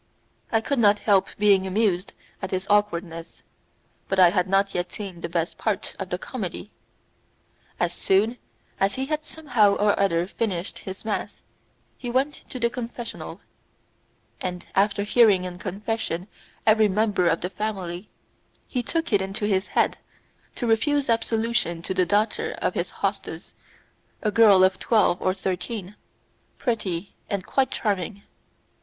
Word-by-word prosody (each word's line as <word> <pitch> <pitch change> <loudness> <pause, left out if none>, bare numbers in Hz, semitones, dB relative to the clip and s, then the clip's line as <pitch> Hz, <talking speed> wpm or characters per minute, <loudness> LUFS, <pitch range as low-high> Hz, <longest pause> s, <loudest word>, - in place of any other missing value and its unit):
I 225 - +3
could 275 +3 -1
not 205 -2 +5
help 200 -2 +3
being 200 -2 +4
amused 190 -2 +1 0.3
at 190 - -3
his 185 0 -2
awkwardness, 170 -5 0 0.6
but 195 - -1
I 180 -2 +7
had 180 -1 +1
not 195 +1 +2
yet 180 0 -2
seen 190 -5 -6
the - - -4
best 170 0 -2
part - - -2
of - - -4
the - - -1
comedy. - - -6 1.1
As 175 -1 +1
soon 210 +7 +2 0.4
as 195 +1 +2
he 265 - -2
had 305 +1 -2
somehow 250 -11 +2
or 205 0 +2
other 175 -4 +2
finished 190 -3 -3
his 190 +2 -8
mass 215 - -3 0.6
he 245 - -4
went 265 +4 +1 0.2
to 255 - -5
the 235 - +3
confessional, 240 -1 -6 1.0
and 180 -1 -4
after 200 +1 +2
hearing 210 -3 +5
in 180 -1 -6
confession 195 -2 -3 0.4
every 215 0 +5
member 205 -2 +2
of 165 - +2
the 180 - -3
family 190 -2 -4 0.6
he 250 - -1
took 330 +3 -2
it 200 - +4
into 195 +2 -2
his 195 -2 +1
head - - +1 0.6
to 245 - -3
refuse 265 +5 +2
absolution 225 -6 0
to 190 - -1
the 185 -1 +2
daughter 210 +4 +1
of - - -1
his - - -1
hostess, - - -4 0.7
a 210 - +2
girl 205 -4 +7
of 185 0 +3
twelve 210 -6 +3
or 185 0 +1
thirteen, 190 +2 -4 0.6
pretty 200 -7 -2 0.2
and 200 -2 -2
quite 270 -1 +1
charming. 200 -1 -2
205 Hz, 150 wpm, -25 LUFS, 185-225 Hz, 1.1 s, I